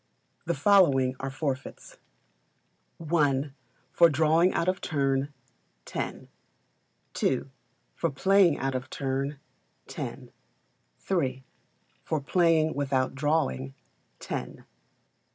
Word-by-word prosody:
The - - 0
following 140 -11 +4
are 135 - -3
Forfeits: 135 -1 -5 1.2
i. 145 -3 +2 0.4
For 170 -1 +6
drawing 160 +4 +3
out 170 - -1
of 185 +1 0
turn, 140 -2 0 0.5
10; - - -5 0.9
ii. 130 - +2 0.5
For 165 - -1
playing 190 +2 +3
out 135 0 -2
of 130 0 -4
turn, 135 +1 -3 0.5
10; - - -7 0.8
iii. 130 -8 0 0.6
For 155 - -1
playing 160 +1 +2
without 135 -2 0
drawing, 130 - -1 0.4
10; - - -4
iv. - - -16
145 Hz, 100 wpm, -27 LUFS, 135-165 Hz, 1.2 s, For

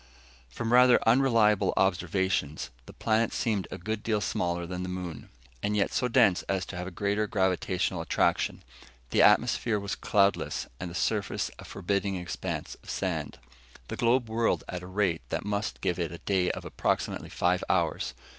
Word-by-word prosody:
From 115 - -2
rather 125 0 +7
unreliable 115 -4 +4
observations, 90 -7 0 0.2
the - - -9
planet 115 0 +1
seemed 105 -5 -1
a - - -6
good 110 +4 -3
deal 110 -2 0
smaller 85 -3 -1
than 90 +1 -5
the 90 - -4
moon, 90 -6 -6 0.3
and 105 0 0
yet 100 - +1
so 125 - +1
dense 105 -6 +4
as 95 -2 0
to - - -8
have 90 0 -4
a - - -3
greater 100 +3 -1
gravitational 95 -2 0
attraction. 85 - 0 0.5
The - - +4
atmosphere 110 -3 +4
was 100 0 -4
cloudless, 100 -1 +1
and 90 - -4
the 85 - -9
surface 105 +1 -1
a - - -9
forbidding 100 +1 -1
expanse 90 -1 -4
of - - -14
sand. - - -2 0.5
The - - -3
globe 120 +1 +2
whirled 115 +1 +1
at 90 - -5
a 90 - -9
rate 95 -3 0
that - - -2
must 105 +1 -2
give 90 0 0
it 85 -3 -1
a 85 - -7
day 95 0 +1
of - - -4
approximately - - -1
five 90 +1 +1
hours. - - 0
100 Hz, 175 wpm, -28 LUFS, 90-110 Hz, 0.5 s, rather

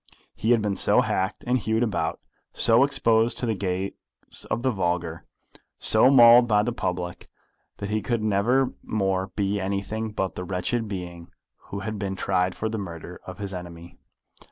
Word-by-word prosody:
He 110 - -2
had 120 -3 +4
been 100 -2 -1
so - - +4
hacked 95 0 -1
and 125 +1 +2
hewed 110 +1 0
about, 110 -4 -1 0.3
so 115 +2 +4
exposed 115 -4 +2
to - - -2
the 115 - +1
gaze 95 -1 -2 0.6
of 110 +3 -1
the 130 - +2
vulgar, 85 -4 -2 0.5
so 110 +4 +4
mauled 120 -2 +8
by 105 -2 +3
the 120 - -1
public, 90 -4 -4 0.5
that 100 0 -5
he 110 0 0
could 115 +1 -1
never 115 +6 +2
more 95 -3 -1
be 100 0 0
anything 100 +3 -2
but 95 -3 -2
the 90 - -5
wretched 95 +6 -1
being 90 -3 -7 0.4
who 100 - -6
had 110 -1 -4
been 95 -1 -3
tried 95 -1 0
for 110 - -2
the 110 0 -3
murder 90 -2 -8
of 90 -1 -7
his 100 -1 -5
enemy. 85 -1 -9
100 Hz, 175 wpm, -25 LUFS, 90-110 Hz, 0.6 s, mauled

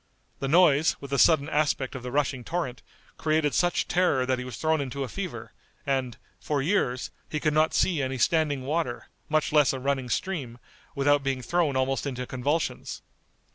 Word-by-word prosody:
The 135 - -2
noise, 155 -1 +4
with 140 -1 -9
the 140 - +1
sudden 155 -1 +5
aspect 145 -3 0
of 130 - -6
the 125 0 -6
rushing 135 -2 0
torrent, 160 -5 -3 0.4
created 155 -2 +1
such 175 -1 +1
terror 175 -8 +2
that 130 0 0
he - - -4
was 125 -2 -7
thrown 160 -1 +1
into 140 0 -4
a - - -4
fever, 190 +5 -6 0.3
and, 130 -4 -1 0.2
for 150 -2 -1
years, 135 -5 0 0.2
he 150 - -2
could 155 -1 +1
not 155 +1 +2
see 170 -6 +2
any 130 0 -2
standing 145 +1 +1
water, 145 -3 -2 0.2
much 155 0 +1
less 150 -4 +5
a 135 - -4
running 135 -1 -1
stream, 135 -8 -3 0.4
without 145 +1 +3
being 135 -2 -2
thrown 170 -4 +1
almost 135 +2 0
into 125 -2 -4
convulsions. 145 +6 -2
140 Hz, 180 wpm, -27 LUFS, 130-155 Hz, 0.4 s, sudden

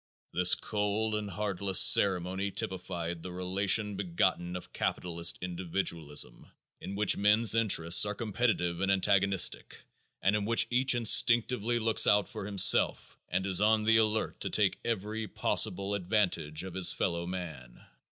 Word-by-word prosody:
This 90 0 +5
cold 105 +1 -3
and 105 -1 -4
heartless 100 -1 -1
ceremony 95 0 +3
typified 85 -3 -6
the 90 - -9
relation 100 +3 -1
begotten 90 -1 -2
of 90 - -10
capitalist 85 -1 -1
individualism 85 -4 -3 0.3
in 100 - -8
which 105 0 0
men's 105 +2 +3
interests 95 -7 +3
are 105 0 -3
competitive 100 -6 -2
and 95 0 0
antagonistic 100 -1 +1 0.4
and 95 +2 0
in 105 - -2
which 115 +2 +2
each 130 +1 +2
instinctively 120 0 +3
looks 115 -1 +3
out 105 -1 +2
for 95 - -9
himself 100 -2 +3
and 95 +2 -2
is 95 0 -1
on 110 +1 +2
the 110 +1 +3
alert 110 0 -1
to - - -3
take - - +1
every 110 0 -4
possible 100 0 -1
advantage 90 -6 -2
of 95 -2 -9
his 95 -2 +4
fellow 85 -1 -3
man. 80 -10 -9
100 Hz, 140 wpm, -29 LUFS, 90-105 Hz, 0.4 s, This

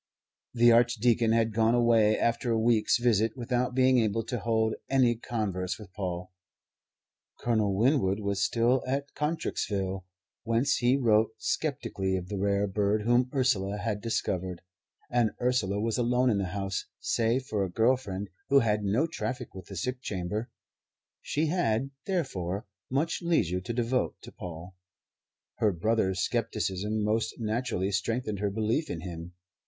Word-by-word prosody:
The 120 0 +6
Archdeacon 120 -1 +3
had 115 -1 +2
gone 115 +2 +3
away 115 -3 +4
after 120 +1 0
a 115 - +2
week's 110 -1 +3
visit 115 -1 +2
without 125 +1 -1
being 130 -1 +4
able 115 0 +1
to 120 +2 -3
hold 110 0 +1 0.2
any 130 -3 +3
converse 95 -6 -3
with 100 -4 -13
Paul; 90 -2 -4 1.1
Colonel 110 -4 +1
Winwood 110 -3 +2
was 100 -1 -1
still 120 +4 +2
at 140 +2 -2
Contrexeville, 100 - -2 0.4
whence 120 +5 +1
he 125 +2 +3
wrote 110 -3 +3
sceptically 115 -10 -2
of 90 -1 -4
the 100 - -3
rare 100 +1 +1
bird 105 +2 0
whom 120 +2 +3
Ursula 105 -7 +1
had 105 -1 -2
discovered; 95 -5 -2 0.5
and 120 -3 +2
Ursula 110 -6 +1
was 115 +3 -1
alone 125 +1 +2
in 100 - +1
the 100 - -1
house, 95 +1 -3
save 120 +3 0
for 105 -5 -1
a 95 - -2
girl 115 +8 +3
friend 100 -5 -5 0.2
who 140 - +5
had 105 -2 +1
no 105 +10 +2
traffic 130 -7 -4
with 95 -1 -10
the 100 - -8
sick 125 +8 -3
chamber. 105 +1 -3 0.7
She 155 +2 -1
had, 135 -7 0 0.2
therefore, 100 - -2 0.2
much 145 +6 0
leisure 90 - +1
to 90 - -5
devote 120 +2 -1
to - - -10
Paul. 90 +1 -9 0.8
Her 105 - +3
brother's 95 0 +1
scepticism 105 +3 -1
most 110 +2 0
naturally 110 -4 -1
strengthened 105 +1 -1
her 105 0 0
belief 110 +9 -1
in 80 - -4
him. 85 -1 -7
110 Hz, 150 wpm, -29 LUFS, 100-125 Hz, 1.1 s, The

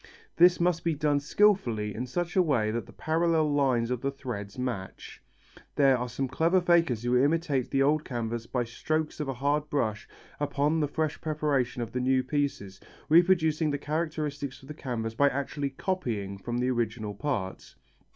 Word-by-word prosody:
This 175 +1 +6
must 175 -1 +1
be 165 -2 +1
done 145 -1 +1
skilfully 140 - +2
in 125 +5 -4
such 175 +6 -3
a 185 - +6
way 125 -11 +1
that 115 +1 -3
the - - -13
parallel 160 -1 +1
lines 125 -4 +2
of 125 -2 -2
the 140 - 0
threads 120 -7 -6
match. 120 -7 -5 0.5
There 135 -2 +5
are 125 0 -3
some 135 +3 -2
clever 165 +8 +2
fakers 170 -10 +2
who 120 +1 +1
imitate 145 -4 +1
the 135 0 +2
old 150 +2 +2
canvas 115 -3 -4
by 125 -2 -1
strokes 155 +7 -2
of 150 - -2
a 135 - -3
hard 145 +3 0
brush 110 -8 -1 0.3
upon 145 +2 +1
the 150 - +1
fresh 155 +1 -2
preparation 140 -5 0
of 115 - -7
the 125 - -2
new 130 0 +2
pieces, 135 -11 -2 0.3
reproducing 160 -2 +4
the 145 - -1
characteristics 150 -3 -3
of - - -13
the - - -5
canvas 115 -6 -4
by 140 +5 +4
actually 140 +1 -3
copying 120 - -3
from 120 +4 -4
the 125 +1 +1
original 115 -3 -2
part. 100 -5 -4
140 Hz, 180 wpm, -28 LUFS, 120-155 Hz, 0.5 s, This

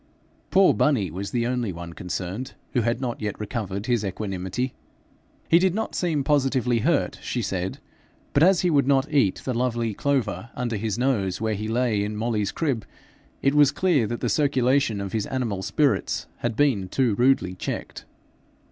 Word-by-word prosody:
Poor 195 0 +5
bunny 115 - +2
was 100 +4 -4
the 120 -1 0
only 120 -4 -1
one 85 -1 -8
concerned 90 +8 -5 0.2
who 125 - +2
had 115 +1 0
not 125 -4 -3
yet 105 -2 -3
recovered 105 -2 -4
his 120 -3 +1
equanimity. 95 +5 -3 0.7
He 170 - +6
did 185 0 +2
not 220 +1 -2
seem 160 -6 0
positively 130 -4 +2
hurt, 155 +6 +1
she 120 - -2
said, 95 -1 -2 0.6
but 140 - +3
as 180 +2 +5
he 180 - +2
would 140 -3 +3
not 140 +2 +2
eat 120 -10 +2
the 130 - -1
lovely 120 -2 0
clover 120 -3 -1
under 120 -2 -2
his 110 0 -2
nose 115 -8 0
where 110 0 0
he 105 +1 -3
lay 115 -3 +1
in 105 +1 -3
Molly's 110 -2 -1
crib, 135 -9 -1 0.6
it 140 - +3
was 145 -2 +6
clear 150 - +2
that 120 +2 -4
the - - 0
circulation 135 -5 +2
of 100 -1 -4
his 110 -2 -1
animal 115 -7 -2
spirits 145 +7 0
had 120 -2 -2
been 120 -9 +2
too 125 -1 +2
rudely 120 -4 +2
checked. 90 - -5
120 Hz, 175 wpm, -25 LUFS, 105-135 Hz, 0.7 s, He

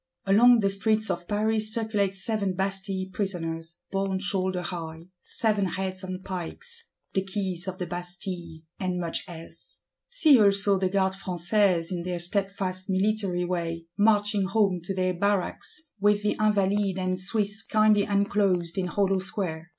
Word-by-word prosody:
Along 230 +4 +6
the 195 -1 +2
streets 215 +2 +1
of 175 0 -4
Paris 215 +1 +1
circulate 215 -4 0
Seven 200 -1 -2
Bastille 190 0 -2
Prisoners, 165 -4 -3 0.2
borne 195 -1 0
shoulder 190 -2 -1
high: 165 -1 -6
seven 210 -4 0
Heads 190 0 -3
on 185 0 -5
pikes; 460 - -6 0.2
the 190 - +1
Keys 190 -2 -2
of 185 -1 -4
the 180 - -3
Bastille; 175 -2 -6 0.2
and 185 -2 -1
much 170 -2 -2
else. 165 -2 -11 0.2
See 315 - +5
also 200 -1 +4
the 185 -1 +1
Garde 190 0 +1
Françaises, 185 -1 +1
in 175 -2 -2
their 180 0 -3
steadfast 185 +1 -2
military 190 -2 +1
way, 170 -2 -3
marching 205 -1 +3
home 195 -2 +1
to 195 - -3
their 185 0 +1
barracks, 205 - -2
with 205 +1 +3
the 210 - +1
Invalides 205 -2 +2
and 185 0 -1
Swiss 205 +2 -2
kindly 215 -1 +3
enclosed 200 -4 +1
in 180 - -1
hollow 195 +1 +1
square. 175 -4 -4
195 Hz, 150 wpm, -27 LUFS, 180-205 Hz, 0.2 s, Along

